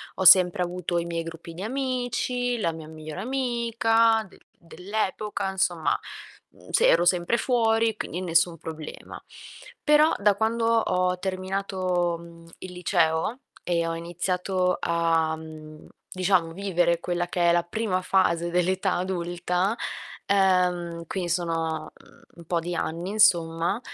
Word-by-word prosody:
Ho 190 - -2
sempre 180 0 +7
avuto 175 0 -3
i 170 - -1
miei 170 -1 -3
gruppi 165 0 -9
di 170 - -9
amici, 245 0 -2
la 170 -6 0
mia 160 -1 -9
migliore 155 +2 -8
amica 230 -2 +1
de - - -19 0.2
dell'epoca, 195 +3 -3
insomma, 175 -4 0 0.5
uhm, - - -19
se - - +3
ero 170 +1 +4
sempre 180 +6 +2
fuori, 225 -2 +2
quindi 180 -4 -5
nessun 170 -1 +2
problema. 155 -1 -9 0.6
Però, 300 +1 +5
da 205 0 +3
quando 225 +2 0
ho 185 -5 +1
terminato, 185 -2 -2
mhmm, 170 0 -14
il 185 -1 -8
liceo 175 +4 0 0.2
e 170 -1 0
ho 165 - -2
iniziato 180 +2 -1
a, 165 -1 +1
mhmm, 155 -1 -11 0.2
diciamo, 185 -3 +1
vivere 175 -3 +1
quella 175 0 -2
che 175 -1 +1
è - - +5
la 175 0 +2
prima 185 +1 -2
fase 175 -3 +1
dell'età 185 +2 +1
adulta, 180 +2 -1 0.5
ehm, 180 -3 +1
quindi 180 0 -3
sono, 165 -2 -2
uhm, - - -21 0.2
un 170 - -13
po' 170 +1 0
di 175 +1 -4
anni 170 +3 -3
insomma, 175 -3 +3
180 Hz, 140 wpm, -25 LUFS, 170-200 Hz, 0.6 s, sempre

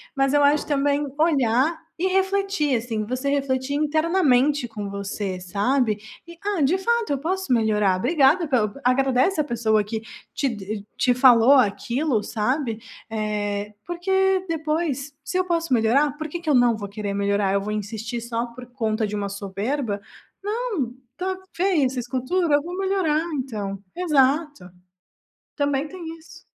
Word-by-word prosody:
mas 270 0 +2
eu 290 0 +4
acho 290 +1 +3
também 285 0 +1
olhar 290 0 +2 0.2
e 375 - +2
refletir 385 -6 +1
assim, 225 -2 -2
você 255 +5 -2
refletir 275 -1 0
internamente 300 -4 +2
com 210 -3 -6
você 200 -1 -4
sabe, 210 +4 0 0.3
e 340 - -10
"ah, 405 -5 0
de 290 +6 +3
fato 470 -2 0
eu 275 - -2
posso 365 -1 -1
melhorar.", 210 -4 +2
obrigada 305 - +3
pela 225 -7 +1
agradece 265 +7 +2
a 305 - +4
pessoa 225 -5 +1
que 220 +1 -4 0.3
te 215 -6 -3
te 250 - +3
falou 250 0 +6
aquilo 240 +1 +2
sabe? 230 +1 -1 0.3
Eh, 210 -1 -2
porque 380 +2 +1
depois 305 -3 -2
se 365 - -2
eu 370 - +1
posso 335 -4 -1
melhorar 255 +6 +2
por 310 0 -4
que 345 +3 -5
que 320 - -3
eu 285 - +4
não 245 -2 +4
vou 205 -2 -6
querer 205 -1 -4
melhorar, 200 -1 +1
eu 200 - +2
vou 210 +2 -4
insistir 220 +3 -4
só 235 0 -3
por 245 +1 -11
conta 220 -3 0
de 210 0 -4
uma 200 -1 -2
soberba? 200 +3 -3 0.4
Não, 415 - -2 0.2
está 370 +7 -3 0.2
feia 355 -6 +2
essa 255 0 -1
escultura 260 +8 -1
eu 290 - +1
vou 350 +2 -6
melhorar 380 -6 +1
então. 210 -7 -4 0.2
Exato, 290 - +1 0.9
também 285 0 +1
tem 370 +1 -10 0.2
isso. 335 +2 -16
265 Hz, 155 wpm, -23 LUFS, 220-315 Hz, 0.9 s, falou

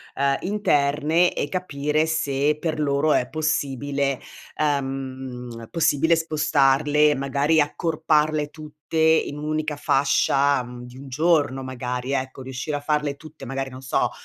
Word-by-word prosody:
ehm, 140 0 +2
interne, 160 -3 +2
e 145 - -2
capire 150 -3 -1
se, 150 -2 0
per 160 -2 -2
loro, 145 +1 +2
è 125 - +1
possibile, 140 -3 -1 0.4
ehm, 130 -5 -3
possibile 160 0 +3
spostarle, 150 -2 +3
magari 140 +4 +1
accorparle 155 -1 +1
tutte, 155 0 -11
in 160 -2 +3
1 150 - -5
unica 155 0 -1
fascia, 140 -1 +2
mhmm, 125 0 -9
di 125 +1 -12
1 135 0 -10
giorno, 145 -2 +1
magari, 125 0 -4
ecco 130 0 -3
riuscire 130 +3 -4
a - - -4
farle 150 -1 -1
tutte, 155 +1 -13
magari, 135 +1 -4
non 130 +1 -10
so, 130 - 0
145 Hz, 135 wpm, -23 LUFS, 135-155 Hz, 0.4 s, possibile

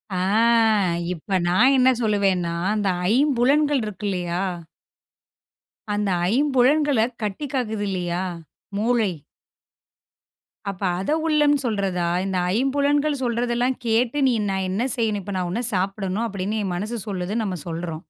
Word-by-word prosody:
ஆ - - -1 1.0
இப்ப 185 +3 -2
நான் 235 +10 +4
என்ன 255 0 +5
சொல்லுவேன்னா, 195 -5 +1 0.2
அந்த 205 -2 0 0.3
ஐம்புலன்கள் 280 +1 +3
இருக்கு 210 0 -6
இல்லையா? 180 -1 -2 1.5
அந்த 205 -1 0 0.2
ஐம்புலன்களை 275 -1 +3 0.2
கட்டிக்காக்குது 220 -2 -2
இல்லையா, 180 -1 -2 0.5
மூளை. 225 -2 +1 1.6
அப்ப 195 0 -7 0.2
அதை 195 +11 -1
உள்ளம் 295 -2 +4
சொல்றதா? 190 -6 -1 0.2
இந்த 190 -1 -1 0.2
ஐம்புலன்கள் 285 +2 +1
சொல்றதெல்லாம் 240 +1 0
கேட்டு, 235 +5 +1
நீ - - +2 0.2
நான் 190 -1 -1
என்ன 205 +5 -1
செய்யணும்? 215 -3 0
இப்ப 200 0 -5
நான் 180 -1 -2
இதைச் 240 +2 -2
சாப்பிடணும் 195 +3 -1
அப்படின்னு 200 +2 -3
என் 185 -2 -2
மனசு 215 +6 -3
சொல்றதுன்னு 200 +3 -2
நம்ம 185 -2 -3
சொல்றோம். 165 -1 -4
215 Hz, 120 wpm, -23 LUFS, 190-255 Hz, 1.6 s, என்ன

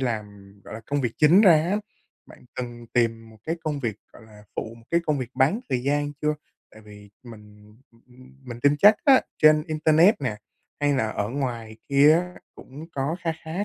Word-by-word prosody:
làm, 115 -5 -2
ừm, 100 -1 -18
gọi - - -10
là, 110 - -8
công 145 0 -1
việc 120 -4 -2
chính 160 +6 +5
ra 190 -6 +7 0.2
á, 205 - +1 0.5
bạn - - -17
cần 120 -1 -7
tìm 115 -2 -1
một 110 - -17
cái 165 +2 -3
công 150 -2 -3
việc, 110 -5 -3 0.2
gọi - - -16
là, 105 -1 -17
phụ, 115 +1 -5
một 115 - -19
cái 170 - +2
công 150 -2 0
việc 125 -2 -5
bán 150 - +1
thời 125 -1 -1
gian 145 +1 -1
chưa? 150 0 +1 0.4
Tại 110 - -16
vì 105 -1 -15
mình 105 -2 -15 0.2
m 115 - -25
m 130 +1 -18 0.2
mình 120 0 -8
tin 145 +2 +3
chắc 210 +2 +7
á 270 -3 +6 0.2
trên 155 -1 +5
internet 155 +4 +3
nè 110 -6 -3 0.4
hay 145 0 +2
là 110 -4 0
ở 105 -1 -3
ngoài 120 -5 -5
kia 140 +2 +5
á 180 +1 -2 0.2
cũng 145 +5 -12
có 140 +5 -2
kha 165 -1 -2
khá 175 +6 -4
130 Hz, 215 wpm, -24 LUFS, 115-155 Hz, 0.5 s, ra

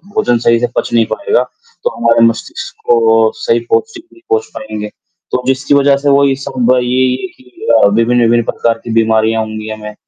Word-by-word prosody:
भोजन 120 - +2
सही 115 0 +4
से 120 - 0
पच - - -1
नहीं 115 -1 +3
पाएगा, 425 +10 0 0.4
तो 485 - +1
हमारे 115 0 +2
मस्तिष्क 115 0 -3
को 115 -2 +3
सही 115 - 0
पौष्टिक 225 - -1
नहीं 345 - -20
पहुँच 440 +1 +1
पाएँगे। 105 -11 -6 0.4
तो 125 - -1
जिसकी 135 +2 0
वजह 140 0 +3
से 140 +1 -1
वो 140 0 +4
ये 135 -1 +1
सब 125 -1 0
ये, 125 - -3
ये 130 +5 0
कि 125 -1 -13 0.2
अ, - - +7
विभिन्न-विभिन्न 115 +2 +2
प्रकार 115 -1 -1
की 115 - -5
बीमारियाँ 110 0 +2
होंगी 110 0 -7
हमें। 105 -1 -7
120 Hz, 190 wpm, -13 LUFS, 115-135 Hz, 0.4 s, अ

